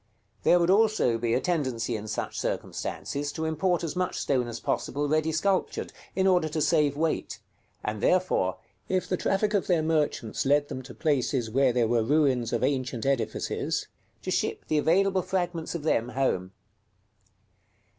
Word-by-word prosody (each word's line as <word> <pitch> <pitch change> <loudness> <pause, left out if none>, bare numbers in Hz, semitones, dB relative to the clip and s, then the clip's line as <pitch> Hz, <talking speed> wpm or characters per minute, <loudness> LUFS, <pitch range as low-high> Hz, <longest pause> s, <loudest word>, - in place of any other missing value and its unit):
There 175 - +5
would 170 +1 +3
also 210 - +3
be 115 0 +1
a - - +2
tendency 130 -9 -1
in 110 0 -5
such - - -3
circumstances 145 +1 -3
to 160 -1 -3
import 170 +3 0
as 165 -1 -3
much 180 0 -1
stone 125 -4 0
as 115 -1 -5
possible 145 +1 -1
ready 155 +2 +1
sculptured, 185 +5 0 0.2
in 190 - +2
order 180 -4 +3
to 155 - -2
save 150 -3 +2
weight; 160 +1 -1 0.5
and 105 -1 -3
therefore, 180 - +2 0.3
if 185 -1 0
the 185 - 0
traffic 200 +4 0
of 200 - +1
their 170 -4 +2
merchants 150 -8 0
led 145 +1 +2
them 130 - -5
to 130 -1 -11
places 130 -6 0
where 135 +1 +3
there 120 -2 +2
were 115 0 +2
ruins 130 -2 +2
of 120 0 0
ancient 130 -3 -1
edifices, 135 -3 -1 0.4
to - - -3
ship - - -1
the 155 - +3
available 190 +4 +3
fragments 175 -3 -2
of 165 - -4
them 120 -6 +1
home. 110 -9 -1
145 Hz, 165 wpm, -27 LUFS, 125-175 Hz, 0.5 s, There